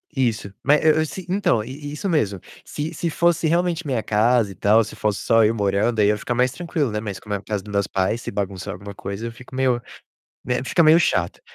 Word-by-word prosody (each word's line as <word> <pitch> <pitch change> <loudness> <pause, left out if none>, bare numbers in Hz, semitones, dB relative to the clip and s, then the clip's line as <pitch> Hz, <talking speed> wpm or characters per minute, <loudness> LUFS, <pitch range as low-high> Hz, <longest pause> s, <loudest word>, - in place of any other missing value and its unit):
Isso. 115 -6 0
Ma 140 - +4
é 155 - +1
eu 155 - +5
eu 155 - +2
se 175 +5 -7
então, 185 - +1
i 145 +5 -8
isso 190 +6 -3
mesmo. 105 - 0 0.3
Se 150 +2 -5
se 170 - -2
fosse 170 0 +2
realmente 175 0 +1
minha 130 -6 -1
casa 110 0 +2
e - - -11
tal, 110 +3 +4
se 105 - -9
fosse 105 -2 -1
só 115 0 +3
eu 110 +1 +3
morando, 105 +2 0
aí, 105 - +5
eu - - +5
ia - - -3
ficar 120 - -3
mais 125 +1 +2
tranquilo, 160 -4 -2
né. 105 - -2
Mas 105 -3 -5
como 105 -1 -4
é - - -1
a - - -11
casa 100 -1 -4
do 105 - -10
meus 100 -1 +1
pais, 95 +5 -1
se - - -5
bagunçar 100 -2 -4
alguma 100 +2 -9
coisa, 100 +3 -6
eu - - -6
fico 125 +3 -13
meio 130 -2 +1 0.6
né, 125 0 -1
fica 170 - +2
meio 160 +1 +7
chato. 95 - 0
115 Hz, 255 wpm, -22 LUFS, 105-150 Hz, 0.6 s, meio